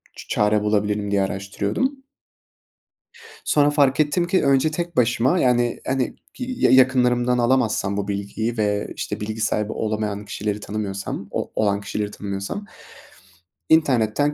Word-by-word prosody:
ç -, -, -11 dB
çare 105 Hz, 0 st, +2 dB
bulabilirim 105 Hz, -1 st, 0 dB
diye 100 Hz, -1 st, +2 dB
araştırıyordum. 100 Hz, -, -2 dB, 1.5 s
Sonra 145 Hz, -1 st, +4 dB
fark 140 Hz, -1 st, +3 dB
ettim 170 Hz, +4 st, +2 dB
ki 185 Hz, -4 st, +2 dB
önce 140 Hz, +3 st, +3 dB
tek 170 Hz, 0 st, -4 dB
başıma, 125 Hz, +7 st, +3 dB
yani, 120 Hz, -1 st, +2 dB
hani, 130 Hz, -1 st, -1 dB, 0.2 s
ki 250 Hz, -, -5 dB, 0.3 s
yakınlarımdan 125 Hz, -1 st, +4 dB
alamazsam 120 Hz, -5 st, +1 dB
bu 100 Hz, -1 st, -2 dB
bilgiyi 100 Hz, +3 st, -3 dB
ve, 105 Hz, -1 st, -1 dB
işte, -, -, -4 dB
bilgi 110 Hz, +1 st, -4 dB
sahibi 105 Hz, 0 st, 0 dB
olamayan 105 Hz, -1 st, -3 dB
kişileri 105 Hz, 0 st, -3 dB
tanımıyorsam, 100 Hz, -2 st, -4 dB
o -, -, -3 dB
olan 100 Hz, -1 st, +1 dB
kişileri 105 Hz, 0 st, -3 dB
tanımıyorsam, 100 Hz, -, -5 dB, 1.0 s
internetten 145 Hz, -2 st, +3 dB
110 Hz, 130 wpm, -22 LUFS, 105-130 Hz, 1.5 s, Sonra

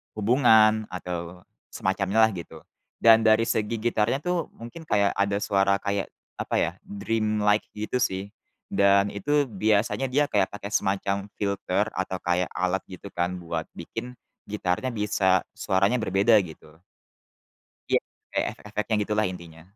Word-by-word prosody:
hubungan 110 Hz, -1 st, +4 dB
atau 90 Hz, -1 st, -6 dB, 0.3 s
semacamnya 95 Hz, +3 st, +1 dB
lah 110 Hz, -, +4 dB
gitu, 85 Hz, -4 st, -9 dB, 0.4 s
dan 115 Hz, -1 st, +8 dB
dari 110 Hz, +1 st, +5 dB
segi 110 Hz, 0 st, -1 dB
gitarnya 115 Hz, +4 st, 0 dB
tuh 175 Hz, -1 st, -1 dB
mungkin 120 Hz, +8 st, -10 dB
kayak 100 Hz, -5 st, +3 dB
ada 100 Hz, 0 st, 0 dB
suara 100 Hz, -1 st, +2 dB
kayak 100 Hz, -1 st, -1 dB, 0.3 s
apa -, -, -2 dB
ya, 80 Hz, -, +2 dB
dreamlike 110 Hz, -, 0 dB
gitu 110 Hz, +4 st, -2 dB
sih, 95 Hz, -2 st, -1 dB, 0.4 s
dan 100 Hz, 0 st, +4 dB
itu 145 Hz, +7 st, +1 dB
biasanya 110 Hz, +4 st, +1 dB
dia 145 Hz, +3 st, +3 dB
kayak 100 Hz, -2 st, +2 dB
pakai 100 Hz, 0 st, -6 dB
semacam 100 Hz, +1 st, 0 dB
filter 100 Hz, 0 st, 0 dB
atau 95 Hz, 0 st, -2 dB
kayak 90 Hz, +1 st, 0 dB
alat 95 Hz, +1 st, 0 dB
gitu 95 Hz, +1 st, -10 dB
kan 90 Hz, +1 st, -1 dB
buat 85 Hz, -2 st, -3 dB
bikin 125 Hz, -, -7 dB, 0.4 s
gitarnya 100 Hz, +3 st, -1 dB
bisa 100 Hz, -4 st, +2 dB, 0.2 s
suaranya 100 Hz, +4 st, +1 dB
berbeda 100 Hz, +2 st, +3 dB
gitu. 80 Hz, -2 st, -13 dB, 1.1 s
Iya -, -, +4 dB, 0.3 s
kayak -, -, 0 dB
efek-efeknya 105 Hz, +1 st, -3 dB
gitulah 105 Hz, +1 st, 0 dB
intinya. 85 Hz, -3 st, -11 dB
100 Hz, 135 wpm, -26 LUFS, 95-110 Hz, 1.1 s, dan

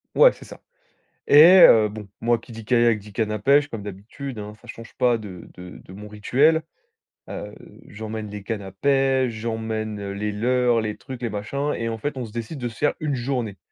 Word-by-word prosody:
Ouais, -, -, +7 dB
c'est -, -, -14 dB
ça. -, -, -13 dB, 0.7 s
Et 145 Hz, +1 st, +9 dB, 0.2 s
heu, 110 Hz, -2 st, +5 dB
bon, 105 Hz, -1 st, -9 dB
moi 120 Hz, +1 st, +2 dB
qui 115 Hz, +1 st, -14 dB
dit 115 Hz, 0 st, -9 dB
kayak, 120 Hz, -1 st, +3 dB
dit, 105 Hz, +1 st, -14 dB
canne 110 Hz, +1 st, -2 dB
à 105 Hz, -, -3 dB
pêche, 140 Hz, +6 st, +3 dB
comme 115 Hz, -7 st, -7 dB
d'habitude 105 Hz, +6 st, -8 dB
hein, 105 Hz, 0 st, -7 dB
ça 120 Hz, -, -17 dB
change 115 Hz, 0 st, -11 dB
pas 120 Hz, -2 st, +2 dB
de 95 Hz, -6 st, -10 dB
de 90 Hz, 0 st, -11 dB
de 95 Hz, -, -13 dB
mon 105 Hz, +2 st, -10 dB
rituel. 135 Hz, +10 st, +2 dB, 0.6 s
A -, -, -6 dB
heu, -, -, -13 dB, 0.3 s
j'emmène 110 Hz, 0 st, -7 dB
les 105 Hz, 0 st, -7 dB
cannes 105 Hz, +1 st, -4 dB
à 95 Hz, -1 st, -9 dB
pêche, 135 Hz, +2 st, +1 dB
j'emmène 110 Hz, -2 st, -4 dB
les 105 Hz, +1 st, -3 dB
leurres, 120 Hz, +2 st, +1 dB
les 105 Hz, -1 st, -4 dB
trucs, 130 Hz, -2 st, -9 dB
les 120 Hz, -, -1 dB
machins. 140 Hz, +8 st, -3 dB
Et 115 Hz, -, -3 dB
en 115 Hz, -, -4 dB
fait, 145 Hz, +5 st, -4 dB
on 130 Hz, -, -4 dB
se 110 Hz, -, -10 dB
décide 115 Hz, +6 st, -6 dB
de 120 Hz, -2 st, -3 dB
se 115 Hz, -, -13 dB
faire 145 Hz, -, +1 dB
1 150 Hz, -2 st, -1 dB
journée. 120 Hz, -5 st, -3 dB
115 Hz, 220 wpm, -23 LUFS, 105-125 Hz, 0.7 s, Et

